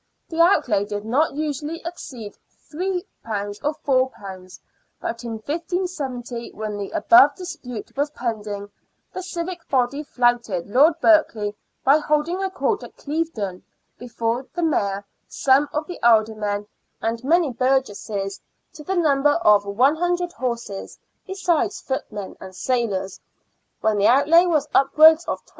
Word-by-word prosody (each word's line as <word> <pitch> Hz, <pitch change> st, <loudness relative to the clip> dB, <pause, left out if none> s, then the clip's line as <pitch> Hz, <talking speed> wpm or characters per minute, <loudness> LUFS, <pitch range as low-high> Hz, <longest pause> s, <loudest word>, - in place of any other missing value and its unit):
The 330 Hz, 0 st, +1 dB
outlay 245 Hz, -, +3 dB
did 205 Hz, 0 st, -5 dB
not 275 Hz, +6 st, +1 dB
usually 305 Hz, +1 st, -3 dB
exceed 255 Hz, -11 st, -7 dB, 0.4 s
£3 360 Hz, +2 st, -2 dB, 0.6 s
or 275 Hz, -3 st, +1 dB
£4, 190 Hz, -4 st, -11 dB, 0.4 s
but 230 Hz, +1 st, -5 dB
in 235 Hz, -1 st, -4 dB
1570, 275 Hz, -, -4 dB
when 215 Hz, -1 st, -4 dB
the 200 Hz, -1 st, -5 dB
above 295 Hz, -5 st, +6 dB
dispute 305 Hz, -, -8 dB
was 285 Hz, +2 st, 0 dB
pending, 210 Hz, -6 st, -5 dB, 0.4 s
the 370 Hz, -, -4 dB
civic 355 Hz, -1 st, -6 dB
body 265 Hz, +2 st, +1 dB
flouted 240 Hz, -, 0 dB
Lord 280 Hz, +10 st, +4 dB
Berkeley 220 Hz, -11 st, +3 dB, 0.3 s
by 275 Hz, +3 st, +6 dB
holding 305 Hz, +5 st, 0 dB
a 385 Hz, -, -1 dB
court 415 Hz, +2 st, -1 dB
at -, -, -12 dB
Clevedon, 285 Hz, -, -3 dB, 0.4 s
before 235 Hz, +1 st, -3 dB
the 350 Hz, -, -1 dB
Mayor, 200 Hz, -10 st, 0 dB, 0.2 s
some 275 Hz, +2 st, +2 dB
of 300 Hz, +1 st, -2 dB
the 355 Hz, -, -8 dB
alder 225 Hz, -2 st, +4 dB
men, 205 Hz, -1 st, -3 dB, 0.3 s
and 230 Hz, +2 st, -2 dB
many 320 Hz, +1 st, +3 dB
burgesses, 220 Hz, -6 st, -1 dB, 0.3 s
to 300 Hz, -, -11 dB
the 380 Hz, +6 st, -2 dB
number 295 Hz, -4 st, +3 dB
of 205 Hz, -1 st, +5 dB
100 340 Hz, -, +1 dB
horses, 235 Hz, -6 st, -4 dB, 0.3 s
besides 380 Hz, -1 st, 0 dB
footmen 210 Hz, -7 st, -5 dB
and 190 Hz, 0 st, -10 dB
sailors, 205 Hz, -6 st, -1 dB, 0.6 s
when 215 Hz, -1 st, +1 dB
the 200 Hz, -, +4 dB
outlay 305 Hz, +8 st, +5 dB
was 305 Hz, -4 st, +1 dB
upwards 315 Hz, +4 st, +6 dB
of -, -, -4 dB
£27. -, -, -24 dB
265 Hz, 135 wpm, -22 LUFS, 215-320 Hz, 0.6 s, above